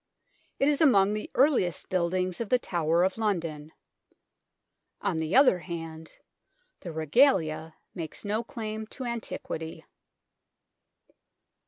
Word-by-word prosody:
It 275 - +2
is 295 +1 +2
among 205 -9 +5
the 215 - -4
earliest 255 - +2
buildings 185 +1 0
of 225 - -4
the 250 - +5
Tower 170 -6 +1
of 190 +4 0
London. 165 -8 -2 1.3
On 195 -5 -1
the 160 +1 -1
other 260 -9 +6
hand, 165 -2 -8 0.6
the 175 - -7
Regalia 160 - +2 0.2
makes 165 +2 -6
no 215 +3 -1
claim 220 -1 -5
to 260 - -7
antiquity. 220 -8 -5
185 Hz, 115 wpm, -28 LUFS, 160-225 Hz, 1.3 s, other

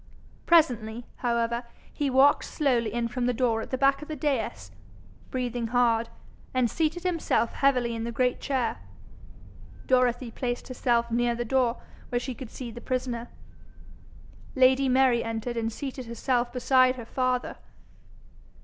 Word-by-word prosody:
Presently, 240 -8 +3
however, 235 -1 0 0.3
he 290 -2 -1
walked 270 +2 +4
slowly 245 -7 0
in 235 +1 -1
from 245 +1 -2
the 250 - 0
door 230 -2 +1
at - - -7
the 260 - -1
back 275 +1 +3
of 300 - -8
the 310 - -4
dais, 225 - -2 0.6
breathing 245 -2 -2
hard, 230 -1 +2 0.5
and 250 -3 +2
seated 325 +2 -1
himself 335 -9 +1
heavily 250 -4 +2
in 225 0 -4
the 235 - -3
great 250 +1 0
chair. 255 - -1 1.1
Dorothy 250 -1 +2
placed 245 +2 -4
herself 235 -2 0
near 240 0 +1
the 240 0 -3
door, 250 0 +1 0.3
where 245 - 0
she 250 +1 -3
could 245 0 -9
see 245 -1 -7
the 240 +1 -9
prisoner. 245 -2 -3 1.3
Lady 260 +1 +4
Mary 255 -2 +4
entered 225 +1 -3
and 225 -1 -1
seated 260 0 -6
herself 240 +1 -1
beside 255 0 +3
her 240 -3 -8
father. 255 +1 -1
245 Hz, 150 wpm, -27 LUFS, 235-260 Hz, 1.3 s, walked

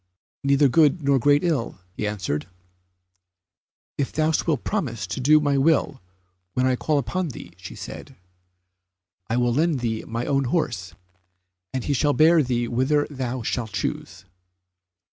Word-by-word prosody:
"Neither 140 +1 +4
good 150 +4 +3
nor 140 -1 +3
great 145 +3 +3
ill," 155 - -1 0.2
answered 95 -8 -2
he. 90 - -16
"If 135 - -2
thou 155 0 +1 0.2
wilt 150 -7 0
promise 125 - -2
to 90 - -5
do 150 +4 +5
my 145 -2 +1
will 145 -2 +2 0.5
when 125 - +2
I 130 0 +3
call 150 +4 0
upon 175 +7 -1
thee," 90 -9 -10 0.2
said - - -8
she, - - -18 1.1
"I 115 - 0
will 120 -1 +2
lend 155 -1 +1
thee 110 -2 -2
my 115 +1 -3
own 140 -1 +1
horse, 120 - -2 0.8
and 130 -2 -3
he 145 - 0
shall 145 +2 +2
bear 160 +2 +5
thee 120 -3 -1
whither 135 +5 +1
thou 130 -3 -3
shalt 115 -2 -3
choose." 90 -2 -4
130 Hz, 150 wpm, -24 LUFS, 110-145 Hz, 1.1 s, do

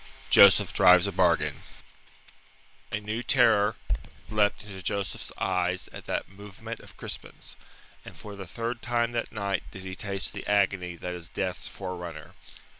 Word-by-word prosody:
JOSEPH 100 -1 +7
DRIVES 90 -2 +7
A 100 - -1
BARGAIN 85 -6 +2 1.3
A 105 - -1
new 105 +3 -3
terror 110 -4 +4 0.6
leapt 105 -1 +2
into 95 -2 -8
Joseph's 100 +1 -2
eyes 90 -1 0
at - - -10
that - - -2
movement 105 +3 -9
of - - -15
Crispin's, - - -7 0.5
and - - -11
for 105 -1 -9
the 95 -2 -8
third 115 +4 -4
time 120 0 0
that 120 -1 -2
night 100 -4 -1
did 95 - -10
he 95 0 -6
taste 100 -1 -2
the - - -7
agony 95 -3 +1
that 90 +1 -5
is 85 -1 -8
Death's 95 -2 -3
forerunner. 90 -4 -7
100 Hz, 150 wpm, -28 LUFS, 90-105 Hz, 1.3 s, JOSEPH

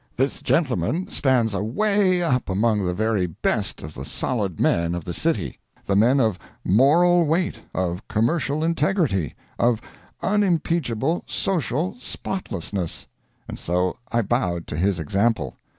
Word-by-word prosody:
This 135 +3 0
gentleman 150 - +1
stands 125 -6 +2
away 185 - +2
up 125 -9 0
among 105 +2 +2
the 90 - 0
very 110 -2 +1
best 85 - -1
of 75 +1 -7
the 65 - -7
solid 95 - -2
men 85 0 +2
of 85 - -5
the 85 - -4
city 140 - -1 0.3
the 100 - +1
men 120 +7 +4
of 110 -7 +1 0.3
moral 170 - +5
weight, 170 +3 0 0.2
of 90 +1 -2
commercial 140 +6 0
integrity, 155 - +1 0.2
of 120 -2 +3 0.4
unimpeachable 170 - +1
social 165 -2 -1
spotlessness 95 - -4 0.4
and - - -7
so 90 +1 0 0.2
I 120 -1 +2
bowed 90 -7 -1
to - - -4
his 95 +3 +1
example. 100 +9 0
115 Hz, 135 wpm, -23 LUFS, -, 0.4 s, moral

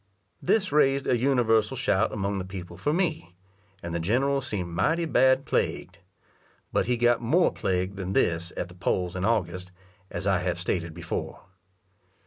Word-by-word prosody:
This 190 -1 +1
raised 140 -2 +3
a - - +2
universal 120 -2 +2
shout 110 -7 +1
among 100 -1 -2
the - - -3
people 95 -2 -8
for 145 - -1
me, 155 - -1 0.5
and 85 -1 -5
the 85 - -1
general 135 +10 +1
seemed 100 -9 -3
mighty 165 - +1
bad 130 -3 +3
plagued. - - -2 0.7
But - - +1
he 125 -1 +1
got 120 0 +3
more 160 +10 +3
plagued 95 +1 -1
than 95 -1 -3
this 85 -2 +1
at - - -2
the 90 - -13
polls 90 0 -1
in 90 +1 -1
August, 90 -5 -1 0.4
as - - -5
I 95 -2 +3
have 90 -1 -2
stated 85 -2 -2
before. 85 -1 -5
100 Hz, 165 wpm, -26 LUFS, 90-130 Hz, 0.7 s, raised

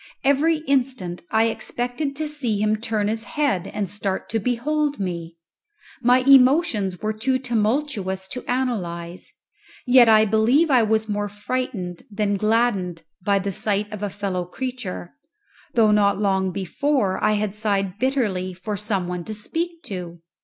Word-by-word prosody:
Every 300 +3 +2
instant 255 - 0
I 220 0 +3
expected 245 +5 -2
to 310 +1 -2
see 270 -8 -1
him 215 +1 +2
turn 215 -2 -1
his 220 +1 -1
head 255 - -1
and 210 -2 -3
start 195 0 -3
to 225 - 0
behold 285 +5 -1
me. 170 -3 -4 0.6
My 250 +1 +4
emotions 260 - +4
were 215 0 0
too 255 +5 0
tumultuous 220 -5 -1
to 250 - -5
analyze, 185 -9 -3 0.5
yet 250 -2 +7
I 215 0 +6
believe 235 +9 +3
I 255 -3 +6
was 220 0 +1
more 205 -1 -2
frightened 205 -4 -4
than 205 -1 0
gladdened 200 -5 +1 0.2
by 200 +1 +3
the 195 +1 -2
sight 205 +2 -1
of 210 -1 -6
a 205 - -1
fellow 195 -2 -3
creature, 210 -3 -6 0.6
though 220 -3 +5
not 200 -1 +3
long 190 -2 +1
before 200 - -1
I 215 - +4
had 210 -1 -1
sighed 200 -2 -1
bitterly 210 -9 0
for 205 +4 -4
some 200 -3 -2
one 180 -1 -4
to 215 - -5
speak 335 +10 -4
to. 175 -3 -6
215 Hz, 155 wpm, -23 LUFS, 195-255 Hz, 0.6 s, yet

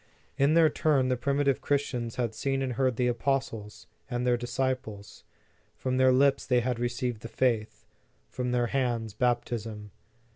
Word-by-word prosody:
In 140 +3 +3
their 165 -1 +6
turn, 145 -4 +2
the 130 - +2
primitive 140 +2 +1
Christians 125 -5 -1
had 120 -3 -1
seen 135 +4 -1
and 130 -2 -2
heard 130 0 +1
the 125 - 0
apostles, 120 -3 -2 0.2
and 120 -1 -2
their 125 -1 +3
disciples. 120 -4 -3 0.5
From 130 0 -2
their 130 0 +5
lips 135 +2 +3
they 125 -1 +2
had 125 -1 -2
received 120 -1 -2
the - - -6
faith, 115 -2 -1 0.4
from 125 -1 -3
their 120 -1 +2
hands, 120 -4 -1
baptism. 115 -3 -2
125 Hz, 155 wpm, -28 LUFS, 115-135 Hz, 0.5 s, their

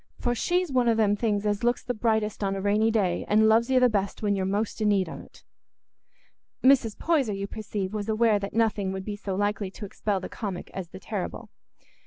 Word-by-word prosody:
For 240 - 0
she's 355 +6 0
one 250 -2 +3
o' 230 - +3
them 210 -2 +3
things 210 -1 -1
as 205 +1 0
looks 240 +1 +1
the 245 - -2
brightest 220 -2 0
on 195 0 0
a - - -3
rainy 210 +3 +2
day, 195 -6 +1
and 215 +1 +4
loves 225 +2 +4
you 260 -1 +4
the 250 - +6
best 200 -2 -2
when 205 -1 +2
you're 190 -1 -1
most 210 +3 -2
i' - - +2
need 200 -3 +2
on't." - - -11 1.2
Mrs. 250 -5 +4
Poyser, 285 -10 +1
you 195 0 -3
perceive, 205 -2 -5
was 210 0 -3
aware 220 -1 +3
that 200 +1 -6
nothing 215 -4 +1
would 190 0 -5
be 210 - -4
so 200 -2 -4
likely 205 0 -1
to 205 +2 -8
expel 200 0 -2
the 185 - -6
comic 195 -5 -6
as 190 -3 -5
the 185 - -10
terrible. 200 -2 -5
210 Hz, 220 wpm, -26 LUFS, 200-225 Hz, 1.2 s, the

